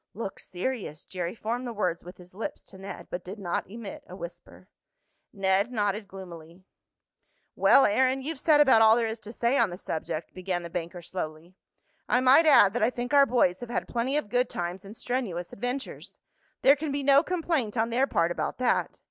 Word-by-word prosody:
"Looks 205 -2 -6
serious," 185 - -4
Jerry 180 0 -4
formed 235 +3 -3
the - - -4
words 180 -5 -1
with 180 +1 -11
his 180 0 -15
lips 215 +4 -6
to 190 - -14
Ned, 195 +1 -8
but 180 - -4
did 190 +4 -8
not 180 -3 -3
emit 235 +8 -8
a - - -10
whisper. - - -10 0.6
Ned 195 +2 +1
nodded 205 -2 -1
gloomily. 175 -2 -11 0.9
"Well, 275 - +6
Aaron, 260 +5 +2
you've 305 0 -4
said 305 0 +4
about 265 -6 +6
all 220 0 +7
there 235 -1 +1
is 220 0 -4
to 215 - -9
say 235 +4 +1
on 230 -4 +3
the 175 - -7
subject," 160 -2 -5
began 185 -1 -3
the 170 - -8
banker 175 +1 -5
slowly. 165 -1 -6 0.6
"I 250 - +4
might 265 +6 +6
add 205 -9 +7
that 245 - -1
I 220 - +4
think 245 +1 -5
our 280 -1 +6
boys 210 -8 +2
have 245 - -8
had 240 - -2
plenty 250 +4 -1
of 300 - -3
good 245 +1 +1
times 175 +2 -4
and 205 +3 -10
strenuous 210 -9 -3
adventures. 250 +5 -5 0.5
There 275 +2 +7
can 300 0 -4
be 280 0 -2
no 275 0 +6
complaint 320 - -1
on 225 +1 +1
their 260 +4 +2
part 170 -7 +1
about - - -3
that. 250 -1 0
220 Hz, 200 wpm, -27 LUFS, 185-255 Hz, 0.9 s, all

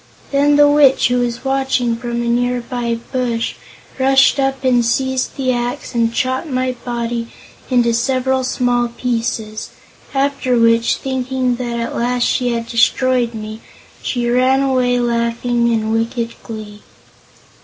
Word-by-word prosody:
Then 290 +1 +3
the 290 0 +6
Witch, 290 -4 +4
who 250 0 +1
was 240 +1 -2
watching 265 -3 +1
from 235 0 -3
a - - -3
near 245 +1 +1
by 235 -1 -3 0.2
bush, 240 -3 -1 0.5
rushed 270 +1 +4
up 270 0 0
and 250 -2 +3
seized 260 +2 -1
the 260 -2 +1
axe 245 +4 -3
and 230 -1 +1
chopped 260 +6 -1
my 255 -2 -1
body 235 -1 -3 0.4
into 240 -2 +3
several 260 +2 0
small 245 -1 +1
pieces, 230 -2 -3 0.5
after 275 -2 +1
which, 230 0 +3
thinking 260 -1 -2
that 240 -1 -3
at 235 - -3
last 245 +1 0
she 250 0 +1
had 230 -1 -2
destroyed 240 0 +1
me, 215 0 -7 0.4
she 240 -2 -2
ran 255 +2 +3
away 250 -2 +1
laughing 235 0 0
in 220 -1 0
wicked 230 +1 -1
glee. 215 -2 -9
245 Hz, 145 wpm, -17 LUFS, 235-260 Hz, 0.5 s, the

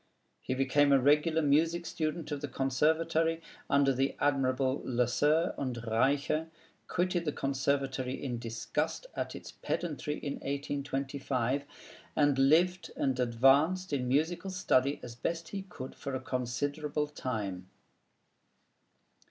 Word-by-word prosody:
He 130 - -2
became 140 +2 +3
a 135 - +6
regular 150 +4 +3
music 165 +4 +2
student 155 0 -3
of 145 -1 -3
the 145 - -3
Conservatory, 160 +5 +1 0.3
under 140 -1 +4
the 135 +2 0
admirable 135 -1 +1
Lesueur 140 +7 +2
and 130 -3 -2
Reicha; 140 +7 +1 0.4
quitted 175 0 0
the 150 - -1
Conservatory 135 -2 -1
in 125 -4 -4
disgust 115 - -3
at - - -3
its - - -9
pedantry, 150 -3 -3
in 140 - -4
1825; 140 -2 -2 0.5
and 145 -2 +3
lived 175 +6 +3
and 130 -2 0
advanced 140 +9 +3
in 125 -3 0
musical 160 +8 0
study 145 -7 +2
as 120 - -7
best 165 +7 -3
he 200 - -4
could 130 -6 -7
for 140 -1 -5
a - - -1
considerable 145 +4 -2
time. 105 -10 -4
140 Hz, 125 wpm, -31 LUFS, 130-155 Hz, 0.5 s, a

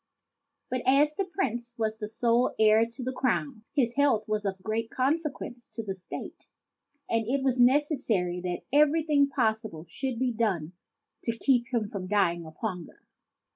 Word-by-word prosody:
But, 255 0 0
as 290 +3 +5
the 390 +5 -1
Prince 240 - -3
was 220 -1 -1
the 210 -1 -5
sole 235 +2 +2
heir 220 +1 +5
to 240 +3 -8
the 260 +1 -2
crown, 255 -2 -1
his 240 -5 +2
health 270 -7 +2
was 215 -1 -1
of 190 -1 -3
great 225 +2 -2
consequence 265 -3 -2
to 225 +1 -6
the 195 -2 -3
State; 185 -1 -9 0.6
and 225 -1 0
it 270 +2 0
was 260 -2 +1
necessary 245 - +2
that 180 -1 -3
everything 300 -1 +4
possible 220 - -1
should 260 - -4
be 255 +1 +1
done 190 -8 -1 0.5
to 230 -1 -1
keep 245 -1 +2
him 230 -4 0
from 185 -2 -5
dying 175 -5 +1
of 155 - -12
hunger. 185 -6 -6
230 Hz, 165 wpm, -28 LUFS, 215-265 Hz, 0.6 s, as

